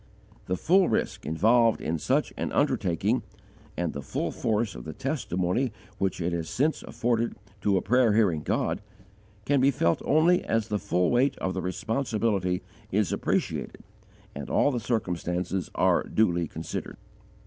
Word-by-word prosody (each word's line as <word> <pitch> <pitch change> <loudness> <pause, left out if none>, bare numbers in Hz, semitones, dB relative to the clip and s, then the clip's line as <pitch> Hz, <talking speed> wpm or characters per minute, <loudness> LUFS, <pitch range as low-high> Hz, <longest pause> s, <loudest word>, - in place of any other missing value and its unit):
The 90 - 0
full 185 - +4
risk - - -1
involved 115 +8 +3
in 80 0 -2
such - - 0
an - - -3
undertaking, 100 +6 +1 0.6
and 85 -2 -1
the 70 - -5
full - - -3
force 110 -2 0
of - - -8
the 80 - -6
testimony 125 - -1 0.3
which 95 -2 0
it 85 0 -1
has 85 -1 -3
since 155 +4 0
afforded 115 0 -1 0.3
to 100 -1 +2
a - - -1
prayer 120 0 +4
hearing 100 -8 +3
God, 80 +4 -1 0.6
can 140 -2 +3
be 135 - +5
felt 85 -10 +1
only 165 +5 +4
as 115 -2 0
the 105 -1 0
full 90 0 +1
weight 130 +3 +2
of 95 - -2
the - - -2
responsibility 105 -3 -1 0.3
is 105 0 +1
appreciated - - -2 0.5
and - - -7
all 145 - +3
the 125 - -1
circumstances 90 -5 -2
are - - +3
duly 85 -6 +1
considered. 80 +2 -6
105 Hz, 155 wpm, -27 LUFS, 90-120 Hz, 0.6 s, be